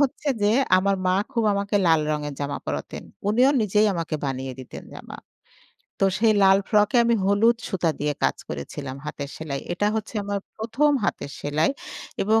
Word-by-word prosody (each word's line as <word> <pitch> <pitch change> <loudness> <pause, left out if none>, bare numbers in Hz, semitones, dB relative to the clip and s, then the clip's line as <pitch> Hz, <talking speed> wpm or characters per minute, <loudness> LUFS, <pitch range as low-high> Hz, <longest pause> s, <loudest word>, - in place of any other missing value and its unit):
হচ্ছে 285 +1 0
যে 205 - +4 0.3
আমার 195 +1 +2
মা 185 - +3 0.2
খুব 230 -2 0
আমাকে 200 +1 0
লাল 160 -1 +5
রঙের 150 -1 -2
জামা 145 0 -2
পরাতেন। - - -4 0.3
উনিও 250 +6 +4
নিজেই 210 +1 +3
আমাকে 165 -2 -3
বানিয়ে 135 -1 -3
দিতেন 130 - -9
জামা। - - -9 0.8
তো 195 - +4
সেই 220 -1 +4
লাল 195 0 +6
ফ্রকে 210 +2 +3
আমি 235 - +3
হলুদ 220 +4 +4
সুতা 170 -3 0
দিয়ে 150 0 0
কাজ - - +2
করেছিলাম 130 - -6
হাতের 140 -2 -5
সেলাই। 140 -3 -4
এটা 205 +4 0
হচ্ছে 215 +2 -5
আমার 200 0 -2 0.2
১ম, 235 +7 +1
হাতের 140 - -2
সেলাই 150 - +1 0.5
এবং 220 +2 +3
195 Hz, 170 wpm, -24 LUFS, 150-215 Hz, 0.8 s, লাল